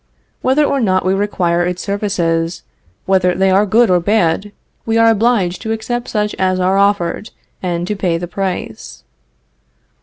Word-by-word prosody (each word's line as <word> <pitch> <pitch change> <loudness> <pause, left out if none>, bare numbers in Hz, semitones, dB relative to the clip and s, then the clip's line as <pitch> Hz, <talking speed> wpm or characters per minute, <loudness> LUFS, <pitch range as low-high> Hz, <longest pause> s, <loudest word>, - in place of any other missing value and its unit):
Whether 265 +4 +2
or 280 -1 0
not 185 -4 +1
we 185 - +2
require 180 -4 0
its 180 0 -2
services, 175 -5 -1 0.4
whether 185 -2 +2
they 190 +1 +2
are 200 +3 +3
good 225 +1 +3
or 180 - +4
bad, 195 0 0 0.3
we 225 0 0
are 230 0 +5
obliged 215 -5 +1
to 220 - -4
accept 240 +2 -3
such 210 -1 -1
as 185 -1 +1
are 185 +1 +1
offered 200 +1 0 0.3
and 175 -2 -2
to 210 - -3
pay 180 -4 -1
the 175 +1 -5
price. 180 - -5
190 Hz, 160 wpm, -16 LUFS, 180-215 Hz, 0.4 s, are